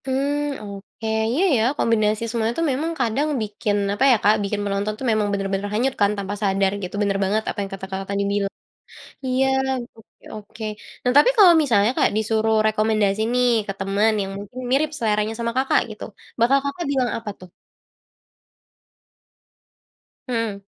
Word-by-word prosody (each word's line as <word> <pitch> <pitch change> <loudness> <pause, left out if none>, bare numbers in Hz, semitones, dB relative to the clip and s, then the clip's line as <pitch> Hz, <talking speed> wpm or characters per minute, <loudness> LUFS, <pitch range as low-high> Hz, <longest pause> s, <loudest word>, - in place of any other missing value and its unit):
Mmm, 280 +2 -1
oke 200 +2 -8 0.2
iya 300 +10 +1
ya 220 - +2
kombinasi 215 -1 +1
semua 225 -1 -1
itu 330 - -2
memang 305 +6 -1
kadang 255 +4 0
bikin 210 -1 -2 0.2
apa 205 - 0
ya - - +6
Kak, 210 +1 +5
bikin 205 +1 -2
penonton 200 +1 -1
itu 260 - -7
memang 215 -1 +1
bener-bener 195 0 -2
hanyut 250 +5 +1
kan 205 0 +4
tanpa 200 0 -4
sadar 195 -1 +2
gitu, 180 +1 -6
bener 200 -1 +1
banget 210 +3 0
apa - - -4
yang 195 - -4
kata 190 0 -6
Kakak 190 0 -5
tadi 200 0 0
bilang. 200 -1 -1 0.7
Iya, 260 +1 +1 0.5
oke 225 - -21
oke, 215 +1 -10 0.4
nah 250 - +2
tapi 295 - +7
kalau 380 -5 +8
misalnya 225 -5 +3
Kak - - +4
disuruh 220 0 +1
rekomendasi 215 -1 +1
nih 250 0 +3 0.2
ke 195 - -2
teman 200 +3 +2
yang 195 0 -4
mungkin 205 +5 -9
mirip 290 +4 +2
seleranya 215 -3 0
sama 235 0 -1
Kakak 265 +1 +3
gitu, 215 - -9 0.4
bakal 240 +4 +4
Kakak 280 +5 -4
bilang 260 -3 +1
apa 225 -2 -6
tuh? 185 - -13 2.8
Mhm. 230 -5 -2
215 Hz, 165 wpm, -22 LUFS, 200-250 Hz, 2.8 s, kalau